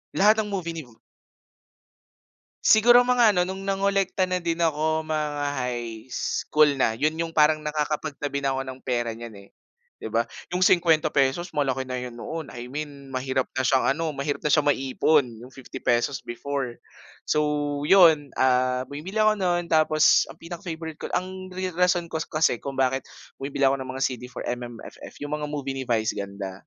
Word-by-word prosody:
Lahat 215 +3 +5
ng 210 - -1
movie 185 -4 -3
ni 165 -2 -6
Vu 115 - -21 1.7
Siguro 240 +3 +7
mga 240 -4 +4
ano - - +5
nung 190 +1 -5
nangolekta 195 -1 +1
na 185 -1 -2
din 165 -1 -1
ako, 160 0 +1
mga 150 -2 -2 0.2
high 120 -1 -5
school 150 +3 +2
na, 115 -4 0
yun 155 +3 +1
yung 165 0 -2
parang 155 0 +4
nakakapag 150 0 -2
tabi 140 -1 -3
na 135 - +1
ako 135 0 -3
ng 130 0 -8
pera 120 -3 -1
niyan, 115 -1 -9
eh, - - -24 0.5
'di 110 - -5
ba? 115 +1 +1 0.2
Yung 180 +1 +1
₱50 160 -2 +2
malaki 135 -2 0
na 125 -1 -4
yun 120 -1 -7
noon, 160 +4 -6
I 120 0 -8
mean 140 0 -7
mahirap 130 0 -1
na 130 - 0
siyang 130 0 +2
ano, 165 +1 -2
mahirap 140 0 -3
na 150 - 0
siyang 150 0 +3
maipon 135 +2 +2
yung 125 +3 -13
₱50 130 0 -2
before. 130 0 -4 0.5
So 150 - +3 0.4
yun, 160 -6 +5
ah, 130 0 +2
bumibili 185 +10 -3
ako 215 0 +4
no'n 175 -2 0
tapos 155 -1 +4
ang - - -13
pinaka-favorite 165 -2 -7
ko - - -7
ang 185 0 -4
ri 185 0 -2
rason 175 -1 +1
ko 160 - -3
kas 160 - -3
kasi 155 -6 +1
kung 140 +3 -6
bakit 135 0 0 0.3
bumibili 135 0 -1
ako 135 - 0
ng 130 -1 -7
mga 130 +1 -5
CD 125 -2 -1
for - - -6
MMFF 120 -1 -7
yung 145 +1 -4
mga 150 - -4
movie 140 -2 -4
ni 130 - -4
Vice 110 -2 0
Ganda. 100 -1 -5
150 Hz, 180 wpm, -25 LUFS, 130-170 Hz, 1.7 s, Siguro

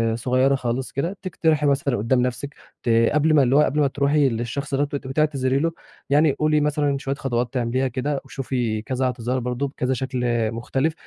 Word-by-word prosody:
صغيّرة 130 +3 +2
خالص 130 0 -3
كده، 170 +8 -3
تقترحي 160 -4 0
مثلًا 140 -2 +1
قدّام 120 +4 +1
نفسِك 125 +3 -3 0.3
ت - - -1 0.2
قبل 150 +1 +3
ما 145 -3 +5
اللي 130 +1 +2
هو 150 - +6
قبل 150 0 +1
ما 145 - +4
ترُوحي 140 +1 +2
للشخص 120 +5 -4
دَوّة 145 +1 +1
وتبقي 135 -2 -4
تعتذري 135 -3 +1
له، 165 +3 +1 0.4
يعني 150 +2 +4
قُولي 155 +2 +1
مثلًا 145 -1 +1
شويّة 135 0 -3
خطوات 120 -3 -2
تعمليها 130 +1 0
كده، 135 +3 -2
وشوفي 120 -5 -2
كذا 130 +2 -2
اعتذار 125 0 -1
برضه 125 +3 -2
بكذا 130 -1 -2
شكل 130 -1 -3
آآ 115 -2 +1
مختلف 135 +7 -1
135 Hz, 190 wpm, -23 LUFS, 125-145 Hz, 0.4 s, هو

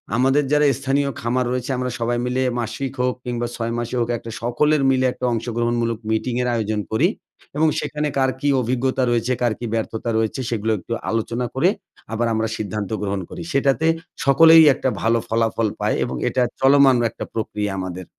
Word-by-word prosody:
আমাদের 135 +4 +3
যারা 150 0 +4
স্থানীয় 140 +1 0
খামার 125 +2 0
রয়েছে, 125 0 -3
আমরা 125 0 -2
সবাই 120 +1 0
মিলে 125 +1 -1 0.2
মাসিক 120 +4 -3
হোক, 125 0 +1
কিংবা 120 -1 -2
৬ 115 -1 -3
মাসে 120 +1 -3
হোক, 115 - 0
একটা 115 0 -9
সকলের 145 +6 +2
মিলে 130 -1 +2
একটা 125 - -4
অংশগ্রহণমূলক 115 0 -1
মিটিংয়ের 125 +2 0
আয়োজন 110 -2 -1
করি। 110 - +4 0.5
এবং 160 +1 +4
সেখানে 150 0 -2
কার 130 -1 +3
কী 145 - -1
অভিজ্ঞতা 130 +2 0
রয়েছে, 120 +1 +1
কার 120 -2 +2
কী 120 - -4
ব্যর্থতা 115 +1 -2
রয়েছে, 110 +3 -1
সেগুলো 110 -1 -1
একটু 90 - -13 0.2
আলোচনা 115 +2 -1
করে, 165 +8 +3 0.4
আবার 120 +1 0
আমরা 110 0 0
সিদ্ধান্ত 105 -1 -4
গ্রহণ 100 -1 -2
করি। - - -7
সেটাতে 140 +2 +2 0.4
সকলেই 160 +4 +8
একটা 130 - -1
ভালো 115 +1 +2
ফলাফল 115 0 +1
পায় - - 0
এবং 65 - -3
এটা 130 - 0 0.2
চলমান 135 -1 +6
একটা - - -7
প্রক্রিয়া 105 -2 -2
আমাদের। 95 0 -5
120 Hz, 175 wpm, -21 LUFS, 115-135 Hz, 0.5 s, সকলেই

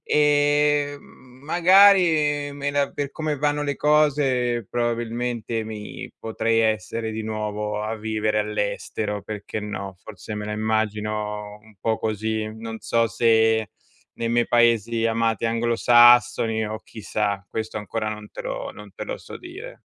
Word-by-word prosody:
ehm, 145 -1 +2
magari, 160 +1 +3
me 140 0 -3
la 140 -1 0
per 145 -1 -4
come 155 -1 -2
vanno 145 +1 0
le 145 -2 -2
cose, 135 -6 +2
probabilmente 120 -1 -2
mi 105 -1 -7
potrei 115 0 0
essere 110 +1 -1
di 110 - -4
nuovo 105 -1 -3
a 110 +1 -3
vivere 110 0 -1
all'estero, 105 0 -3
perché 105 0 -6
no. 100 -2 -5
Forse 105 0 -8
me 105 0 -4
la 105 - -3
immagino 105 -1 -2
un 110 0 -19
po' 110 +1 0
così. 110 0 -2
Non 115 0 -6
so 115 0 +1
se 110 -2 +2 0.5
nei 115 - -1
miei 120 0 +2
paesi 115 -1 +3
amati 115 -1 0
anglosassoni 115 -1 +4
o 110 +1 -5
chissà, 105 -2 -3
questo 110 -1 -4
ancora 110 +1 -3
non 105 -1 -7
te - - -8
lo - - -4
non - - -12
te - - -6
lo - - -5
so - - -10
dire. 390 +8 -10
115 Hz, 140 wpm, -23 LUFS, 110-140 Hz, 0.5 s, anglosassoni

